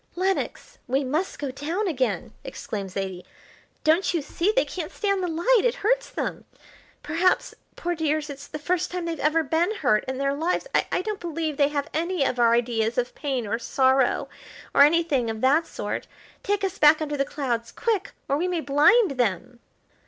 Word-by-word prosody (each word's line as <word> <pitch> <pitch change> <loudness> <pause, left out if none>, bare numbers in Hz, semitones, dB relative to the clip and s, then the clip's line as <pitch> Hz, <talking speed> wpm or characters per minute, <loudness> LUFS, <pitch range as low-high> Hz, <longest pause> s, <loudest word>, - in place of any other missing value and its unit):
"Lenox, 380 +2 -2
we 265 +3 +1
must 305 +8 -2
go 280 -2 -4
down 325 +10 -2
again," 245 - -1
exclaimed 200 -3 -5
Zaidie. 190 -1 -4 0.6
"Don't 330 +4 +3
you 320 - 0
see 340 +7 0
they - - +2
can't 340 -4 -5
stand 395 -2 0
the 360 - -1
light; 375 +9 +3
it - - +2
hurts - - +2
them. - - -4 0.6
Perhaps, 330 +5 +1 0.2
poor 350 0 -2
dears, 310 -2 -1
it's 285 -1 -9
the - - -6
first 355 +4 -1
time 360 -1 -4
they've 330 -3 -3
ever 315 +2 +2
been 330 +8 +1
hurt 245 - +2
in 260 0 -3
their 275 +1 0
lives. 325 +10 -1
I - - +1
don't 425 -1 -3
believe 325 -3 -3
they 285 - +4
have 285 -1 -2
any 340 0 0
of 255 -2 -1
our 235 -1 +5
ideas 230 -1 0
of 245 0 0
pain 270 -6 -2
or 225 +3 -2
sorrow 260 +1 +2 0.5
or - - +5
anything 295 -5 +4
of 220 -1 -4
that 295 +5 +3
sort. - - -4 0.3
Take 405 0 -1
us 385 -2 -2
back 300 +1 +7
under 300 -2 -2
the 275 - +1
clouds 240 -5 -3
quick, 450 -5 -1
or 280 - +1
we 350 +4 0
may 355 -2 -1
blind 315 +9 +4
them." 240 +2 -1
300 Hz, 190 wpm, -25 LUFS, 260-350 Hz, 0.6 s, back